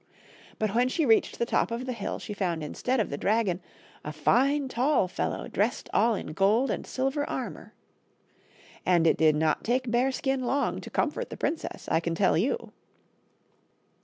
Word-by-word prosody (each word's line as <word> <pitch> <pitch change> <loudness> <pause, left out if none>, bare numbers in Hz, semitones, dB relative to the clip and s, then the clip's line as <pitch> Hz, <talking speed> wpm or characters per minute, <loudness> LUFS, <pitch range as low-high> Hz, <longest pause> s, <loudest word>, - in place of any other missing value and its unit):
But 215 -2 -1
when 245 +2 +3
she 320 +3 0
reached 225 -3 +3
the 235 - 0
top - - +1
of 235 +2 -4
the 255 - -3
hill 220 -4 -4
she 210 - -7
found 175 -5 -2
instead 250 - -1
of 210 - -1
the 140 - -4
dragon 200 -4 +1 0.4
a 150 - -5
fine 265 - +2
tall 255 -3 +2
fellow - - -3
dressed - - -1
all 230 -1 +3
in 175 - -6
gold 210 +9 +3
and - - -4
silver 270 +3 -1
armor. - - -6 1.1
And 175 -2 +3
it 160 - +5
did 155 -1 +4
not 155 0 +1
take 250 +1 0
Bearskin 265 +2 +1
long 275 +3 0
to - - -9
comfort - - -1
the - - -7
princess, 325 - -3
I - - +4
can 170 0 -2
tell 190 +2 +3
you. 260 - -1
230 Hz, 175 wpm, -28 LUFS, 180-260 Hz, 1.1 s, it